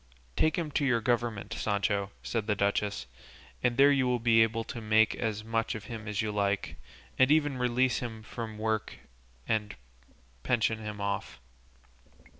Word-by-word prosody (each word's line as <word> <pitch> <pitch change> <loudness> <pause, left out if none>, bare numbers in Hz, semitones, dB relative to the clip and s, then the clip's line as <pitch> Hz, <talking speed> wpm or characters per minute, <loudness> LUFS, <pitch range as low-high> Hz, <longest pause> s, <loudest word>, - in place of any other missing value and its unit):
"Take 155 - +2
him 165 -4 -2
to 145 - 0
your 125 -4 +3
government, 115 -3 -1
Sancho," 100 -2 0
said 110 -3 -2
the 105 - +2
duchess, 100 -5 0 0.6
"and 125 0 +1
there 140 +1 +7
you 135 -2 +2
will 125 0 +2
be 115 -1 +4
able 115 0 +2
to 115 - -7
make 110 0 +4
as 110 -2 -3
much 115 +1 -1
of 110 - -6
him 115 -3 -7
as 105 0 -1
you 110 - -1
like, 100 -1 -1 0.4
and 130 - +6
even 145 -3 +3
release 125 +1 +2
him 115 -3 -6
from 110 -1 -6
work 110 0 -2 0.5
and 105 -2 -1 0.7
pension 110 - +1
him 105 -1 -6
off." 100 -12 -3
110 Hz, 165 wpm, -30 LUFS, 105-120 Hz, 0.7 s, there